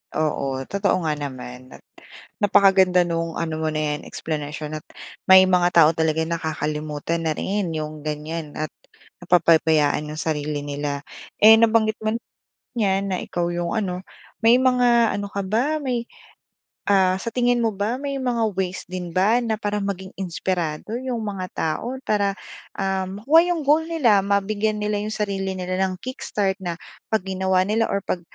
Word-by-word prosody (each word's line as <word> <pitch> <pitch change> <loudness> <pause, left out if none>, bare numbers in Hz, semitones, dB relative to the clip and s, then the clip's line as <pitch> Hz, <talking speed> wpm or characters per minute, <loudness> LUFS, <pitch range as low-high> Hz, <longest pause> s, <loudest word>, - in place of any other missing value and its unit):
Oo, 140 -3 -1 0.2
totoo 195 -2 +1
nga 155 -1 +1
naman 130 -2 -7
at - - -17 0.6
napakaganda 190 -3 +5
no'ng 165 -1 -2
ano 160 -1 -2
mo 160 - -1
na 155 0 -1
'yan - - -10
eksplanasyon 155 0 -5
at - - -25 0.4
may 190 0 +9
mga 180 -1 +3
tao 160 -2 +7
talaga 160 0 +1
nakakalimutan 160 0 -3
na 155 - 0
rin 195 -3 -2
'yong 155 -1 -5
ganyan 150 0 -5
at 155 0 -3 0.5
napapabayaan 160 -4 +3
'yong 155 - -5
sarili 150 -2 -2
nila. 145 0 -4 0.4
Eh 220 +1 +10
nabanggit 220 -1 +3
mo 215 +1 0
na 235 - -4 0.6
'yan 195 -1 +1
na 185 - 0
ikaw 175 0 -2
'yong 175 0 -2
ano. 185 -4 -2 0.4
May 230 +2 +7
mga 245 -3 +4
ano 200 0 -3
ka 200 - -3
ba? 260 +10 0
May, 245 -3 -1 0.9
ah, 190 -2 +4
sa 230 - -4
tingin 245 -1 +2
mo 225 -2 +1
ba 210 +6 -2
may 280 0 -3
mga 235 -4 0
ways 190 0 -2
din 180 -1 -5
ba 210 +7 +3
na 220 -2 -1
para 205 -1 -2
maging 190 -1 -4
inspirado 180 0 -3
'yong 255 -2 -3
mga 195 -3 -4
tao? 235 +12 -2
Para, 200 -2 +1 0.4
ah, 190 -1 -1
makuha 270 - +4
'yong 335 -3 -1
goal 300 +3 +4
nila. 240 -12 +3
Mabigyan 205 +2 0
nila 210 0 0
'yong 215 +1 -4
sarili 195 -2 -2
nila 185 0 -4
nang 190 -1 0
kick-start 205 -6 -2
na 175 -2 -4 0.3
'pag 220 -4 +1
ginawa 190 -1 +1
nila 220 +3 +1
or 200 - -1
'pag 175 - -2
190 Hz, 165 wpm, -23 LUFS, 160-215 Hz, 0.9 s, Eh